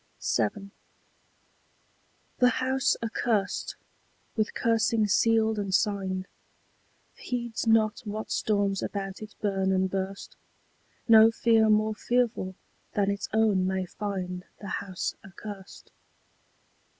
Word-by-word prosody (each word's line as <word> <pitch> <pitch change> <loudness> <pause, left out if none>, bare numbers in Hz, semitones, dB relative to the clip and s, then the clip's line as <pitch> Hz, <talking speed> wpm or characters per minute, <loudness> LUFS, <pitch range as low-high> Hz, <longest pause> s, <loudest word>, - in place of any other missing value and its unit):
VII. 200 -2 -1 1.7
The 250 - +6
house 265 +2 +1
accurst, 220 -2 -1 0.6
with 215 -2 -1
cursing 230 -1 +2
sealed 220 +2 +3
and 200 -2 -3
signed, 190 -3 0 0.9
Heeds 240 -2 -4
not 220 -1 +3
what 215 -2 -6
storms 200 -2 +1
about 195 -1 -4
it 215 -1 -9
burn 195 -2 +1
and 190 0 +1
burst: 195 0 -4 0.7
No 225 -1 +8
fear 225 -1 +3
more 215 0 +3
fearful 235 -5 0 0.4
than 200 -1 +2
its 200 - -4
own 210 -4 +3
may 190 0 -1
find 180 -1 -4 0.2
The 200 - -7
house 185 -3 -3
accurst. 195 +1 -10
210 Hz, 105 wpm, -28 LUFS, 195-225 Hz, 1.7 s, No